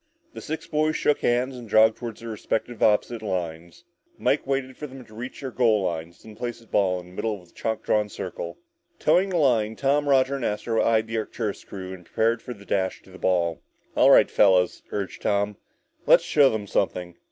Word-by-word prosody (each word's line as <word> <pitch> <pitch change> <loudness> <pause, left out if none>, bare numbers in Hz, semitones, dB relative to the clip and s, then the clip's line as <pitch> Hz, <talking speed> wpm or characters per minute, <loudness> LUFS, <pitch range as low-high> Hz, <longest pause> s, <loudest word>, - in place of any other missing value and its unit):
The - - -8
six 160 +1 -5
boys 155 -1 0
shook 150 - +2
hands 125 +2 +1
and 120 -3 -10
jogged 110 +1 +5
toward 115 -3 -7
respective 115 +1 -3
opposite 110 +2 +2
lines. 85 - -4 0.3
Mike 140 - +1
waited 135 -1 -1
for 150 - -7
them 130 -2 -11
to 110 - -18
reach 120 +6 -7
their 135 -2 -5
goal 110 -4 +3
lines, 85 -1 -4
and 110 - -10
then - - -18
placed 120 -1 -4
the 115 - -19
ball 95 -4 +1
in 90 - -11
the - - -15
middle 110 +3 -2
of 90 - -19
a - - -25
chalk 110 -1 -3
drawn 105 -1 +1
circle. 85 -4 -6 0.4
Toeing 190 +2 +3
the 180 - 0
line, 115 -7 +2
Tom, 145 +3 +1
Roger 135 0 +3
and 135 - -6
Astro 115 +1 0
eyed 110 -1 +3
the 115 0 -2
Arcturus 110 -1 -4
crew 95 -1 -7
and 90 -1 -11
prepared 115 +6 0
for 125 - -7
the 100 -1 -15
dash 95 -2 -1
to 95 - -18
the 95 - -12
ball. 85 -3 +1 0.3
"All - - +6
right, - - +6
fellas," 95 -3 +4
urged 100 -2 -4
Tom, 100 0 0 0.5
"let's - - +7
show 145 -3 +5
them 110 -3 -3
something!" 90 -3 -1
110 Hz, 210 wpm, -25 LUFS, 95-125 Hz, 0.5 s, let's